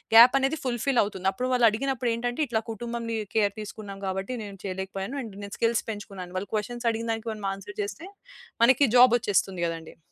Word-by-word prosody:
Gap 245 Hz, +3 st, +10 dB
అనేది 270 Hz, +4 st, +1 dB
fulfil 245 Hz, +1 st, +1 dB
అవుతుంది. 190 Hz, -2 st, -3 dB
అప్పుడు 250 Hz, +6 st, -3 dB
వాళ్ళడిగినప్పుడు 245 Hz, +1 st, +2 dB
ఏంటంటే 245 Hz, +5 st, -2 dB
ఇట్లా 225 Hz, -2 st, 0 dB
కుటుంబంని 230 Hz, 0 st, -4 dB, 0.2 s
కేర్ 205 Hz, -2 st, +3 dB
తీసుకున్నాం 200 Hz, -1 st, -8 dB
కాబట్టి 190 Hz, +6 st, -3 dB
నేను 200 Hz, -1 st, -8 dB
చేయలేకపోయాను. 190 Hz, +6 st, -4 dB
అండ్ 215 Hz, -5 st, -8 dB
నేను 200 Hz, -, -7 dB
స్కిల్స్ 230 Hz, 0 st, +2 dB
పెంచుకున్నాను. 195 Hz, -4 st, -8 dB
వాళ్ళు 190 Hz, +1 st, -5 dB
క్వెషన్స్ 240 Hz, +3 st, -2 dB
అడిగినదానికి 225 Hz, 0 st, -3 dB
మనం 210 Hz, -2 st, -7 dB
ఆన్సర్ 385 Hz, -, -10 dB
చేస్తే 385 Hz, -3 st, -6 dB, 0.6 s
మనకి 260 Hz, +3 st, +6 dB
జాబ్ 245 Hz, -1 st, +8 dB
ఒచ్చేస్తుంది 190 Hz, -4 st, 0 dB
గదండీ. 165 Hz, -1 st, -6 dB
225 Hz, 165 wpm, -27 LUFS, 195-245 Hz, 0.6 s, Gap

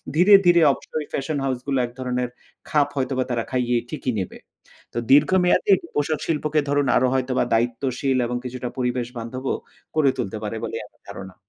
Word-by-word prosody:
ধীরে, 180 Hz, +6 st, +6 dB
ধীরে 175 Hz, -1 st, +6 dB
অবশ্যই 150 Hz, +2 st, -5 dB
ফ্যাশন 145 Hz, +2 st, -2 dB
হাউসগুলো 135 Hz, +1 st, -1 dB
এক 120 Hz, -, -9 dB
ধরনের 125 Hz, -1 st, -2 dB, 0.4 s
খাপ 150 Hz, -2 st, +3 dB
হয়তোবা 130 Hz, -1 st, 0 dB
তারা 120 Hz, -1 st, 0 dB
খাইয়ে 125 Hz, -1 st, +1 dB
ঠিকই 140 Hz, -4 st, -2 dB
নেবে। 95 Hz, -, -5 dB, 0.6 s
তো -, -, -3 dB
দীর্ঘ 145 Hz, +2 st, +6 dB
মেয়াদি 180 Hz, -, +3 dB, 0.2 s
পোষাক 145 Hz, +1 st, 0 dB
শিল্পকে 155 Hz, -1 st, +1 dB
ধরুন 145 Hz, 0 st, +2 dB
আরো 130 Hz, -, +4 dB
হয়তোবা 130 Hz, -1 st, +1 dB
দায়িত্বশীল 125 Hz, +3 st, 0 dB
এবং 120 Hz, +1 st, -2 dB
কিছুটা 125 Hz, 0 st, -4 dB
পরিবেশবান্ধবও 125 Hz, +1 st, -3 dB, 0.4 s
করে 150 Hz, -4 st, +4 dB
তুলতে 110 Hz, -4 st, -3 dB
পারে 110 Hz, +2 st, -3 dB
বলে -, -, -4 dB
আমার -, -, -29 dB
ধারণা। 95 Hz, -1 st, -8 dB
130 Hz, 160 wpm, -23 LUFS, 125-145 Hz, 0.6 s, ধীরে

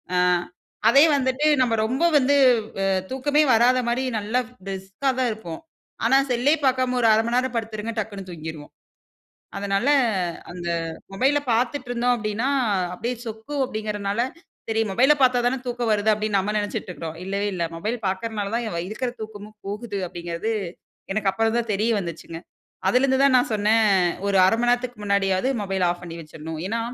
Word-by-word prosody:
ஆ -, -, +2 dB, 0.7 s
அதே 275 Hz, +4 st, +7 dB
வந்துட்டு 260 Hz, +1 st, 0 dB, 0.2 s
நம்ம 240 Hz, -3 st, +2 dB
ரொம்ப 255 Hz, +8 st, -1 dB
வந்து 285 Hz, +1 st, +3 dB, 0.5 s
அ -, -, +1 dB, 0.2 s
தூக்கமே 290 Hz, +3 st, +1 dB
வராத 245 Hz, +3 st, +4 dB
மாரி 240 Hz, +2 st, 0 dB, 0.2 s
நல்லா 215 Hz, +4 st, 0 dB, 0.3 s
பிரிஸ்க்கா 195 Hz, +7 st, -3 dB
தான் 255 Hz, -, +2 dB
இருப்போம். 215 Hz, -7 st, -7 dB, 0.5 s
ஆனா 270 Hz, -, +5 dB
செல்லே 250 Hz, +4 st, +3 dB
பார்க்காம 255 Hz, -1 st, +2 dB
ஒரு 230 Hz, -, +4 dB
1/2 220 Hz, +1 st, +3 dB
மணிநேரம் 250 Hz, +2 st, 0 dB
படுத்துருங்க 225 Hz, -1 st, -3 dB
டக்ன்னு 200 Hz, -3 st, -4 dB
தூங்கிருவோம். 160 Hz, -3 st, -8 dB, 0.9 s
அதனால 200 Hz, +5 st, 0 dB, 0.6 s
அந்த 175 Hz, -1 st, -6 dB, 0.4 s
மொபைல்ல 270 Hz, +8 st, +2 dB
பார்த்துட்டுருந்தோம் 245 Hz, 0 st, 0 dB
அப்டின்னா, 220 Hz, +3 st, -2 dB, 0.5 s
அப்டியே 240 Hz, +6 st, -3 dB
சொக்கு 220 Hz, +6 st, -7 dB
அப்டிங்குறனால 210 Hz, -2 st, -3 dB, 0.5 s
சரி 225 Hz, 0 st, +1 dB
மொபைல 255 Hz, +9 st, +5 dB
பார்த்தா 250 Hz, -1 st, +4 dB
தானே 260 Hz, +2 st, +1 dB
தூக்கம் 240 Hz, -2 st, -1 dB
வருது 210 Hz, +1 st, +2 dB
அப்டின் 210 Hz, -1 st, -1 dB
நம்ம 195 Hz, +2 st, -1 dB
நெனைச்சுட்டு 205 Hz, -1 st, -3 dB
இருக்கிறோம். 165 Hz, -2 st, -7 dB
இல்லவே 200 Hz, +2 st, -1 dB
இல்ல 170 Hz, -2 st, -1 dB
மொபைல் 215 Hz, +8 st, -3 dB
பார்க்கிறதனால 205 Hz, +1 st, -2 dB
தான் 220 Hz, -8 st, -2 dB
இருக்கற 240 Hz, +4 st, -3 dB
தூக்கமும் 215 Hz, 0 st, -9 dB
போகுது 205 Hz, 0 st, -4 dB
அப்டிங்கிறது 170 Hz, +5 st, -4 dB, 0.6 s
எனக்கு 200 Hz, -1 st, +1 dB
அப்புறம் 225 Hz, +3 st, +1 dB
தான் 230 Hz, -2 st, -2 dB
தெரிய 215 Hz, +4 st, +1 dB
வந்துச்சுங்க. 170 Hz, -2 st, -7 dB, 0.5 s
அதிலிருந்து 265 Hz, +5 st, +3 dB
தான் 265 Hz, -2 st, +5 dB
நான் 245 Hz, -, 0 dB
சொன்னே 210 Hz, +1 st, +3 dB, 0.5 s
ஒரு 195 Hz, -, +2 dB
அர 190 Hz, -, +3 dB
மணநேரத்துக்கு 245 Hz, -1 st, 0 dB
முன்னாடியாவது. 200 Hz, +2 st, +1 dB
மொபைல 195 Hz, -2 st, -1 dB
ஆஃப் 175 Hz, 0 st, -5 dB
பண்ணி 165 Hz, -1 st, -7 dB
வச்சருணும். 160 Hz, +1 st, -8 dB
ஏனா, 230 Hz, +4 st, -1 dB
220 Hz, 150 wpm, -23 LUFS, 195-245 Hz, 0.9 s, அதே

